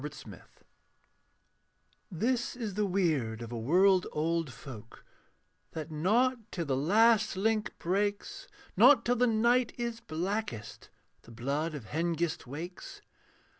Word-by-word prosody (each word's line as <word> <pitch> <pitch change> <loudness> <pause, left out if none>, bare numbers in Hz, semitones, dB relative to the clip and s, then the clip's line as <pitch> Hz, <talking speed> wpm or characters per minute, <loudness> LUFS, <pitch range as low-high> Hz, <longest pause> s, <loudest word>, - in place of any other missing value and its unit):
AN 150 - -3 0.2
ALLIANCE 90 - -12 1.7
This 240 +9 -1
is 225 -5 -4
the 210 +1 0
weird 150 - 0
of 115 - -8
a 120 - -4
world 180 - +3
old 165 -1 -1
folk, 115 -2 -12 0.7
That 160 0 -6
not 230 +11 +2
till 170 -2 -3
the 135 -3 0
last 215 - +3
link 215 +2 0
breaks, 200 +3 -2 0.3
Not 245 +4 +6
till 245 +1 +2
the 245 +1 +3
night 235 +2 +2
is 235 -1 -3
blackest, 180 - -4 0.3
The - - -18
blood 140 +7 -2
of 135 -7 -8
Hengist 165 +1 -2
wakes. 165 +7 -8
180 Hz, 130 wpm, -30 LUFS, 150-220 Hz, 1.7 s, Not